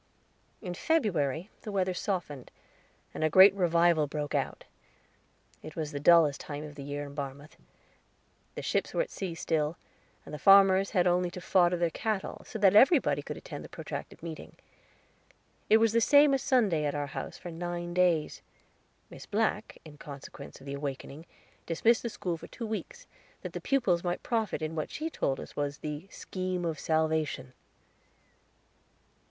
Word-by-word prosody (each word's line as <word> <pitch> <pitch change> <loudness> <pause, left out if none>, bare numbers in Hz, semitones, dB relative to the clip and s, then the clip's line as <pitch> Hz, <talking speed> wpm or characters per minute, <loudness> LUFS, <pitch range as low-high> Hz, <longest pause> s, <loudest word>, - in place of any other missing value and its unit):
In 180 -3 -4
February 180 - 0
the 215 - -6
weather 185 -2 0
softened, 175 - -4 0.6
and - - -3
a 155 - +3
great 190 +4 +8
revival 170 -4 +3
broke 145 -1 -4
out. - - -2 1.0
It 155 - -10
was 155 -2 -3
the 145 - -4
dullest 155 -2 +5
time 145 0 -6
of 150 -1 -8
the 145 - -9
year 145 +1 -5
in 140 - -10
Barmouth. 140 +1 -7 1.0
The - - -5
ships - - -1
were - - +3
at - - -11
sea 185 -4 -5
still, 160 -1 -1 0.5
and - - -10
the 150 - -5
farmers 195 -1 +6
had 180 -4 +2
only 180 0 +2
to 175 - -8
fodder 180 -1 +3
their 170 -1 0
cattle, 215 +2 -3
so 225 - -6
that 200 -2 +4
everybody 215 - +5
could - - -7
attend - - -8
the - - -11
protracted - - -7
meeting. 165 -2 -8 1.1
It 220 - +7
was 225 -1 +3
the 230 - +3
same 285 +3 +6
as 270 - +1
Sunday 215 - +2
at 145 - -1
our 145 0 -1
house 140 - -6
for 175 - -8
nine 175 +1 -4
days. 175 -4 +1 0.7
Miss - - -11
Black, 215 0 -1
in 150 -2 -13
consequence 140 0 -10
of 135 - -15
the 140 - -5
awakening, 140 +2 -6 0.4
dismissed 225 +8 +3
the 235 - -3
school 175 -5 -3
for - - -11
two 235 - -7
weeks, 225 - -6 0.4
that - - -6
the - - -5
pupils 220 -11 +1
might 175 -1 -2
profit 225 -8 -1
in 155 +1 -3
what 155 -2 -3
she 320 +2 -4
told 135 - -1
us - - -10
was 145 0 -2
The 150 +4 -6
Scheme 185 -3 -4
of 160 -2 -2
Salvation. 155 -5 -1
175 Hz, 170 wpm, -29 LUFS, 150-195 Hz, 1.1 s, great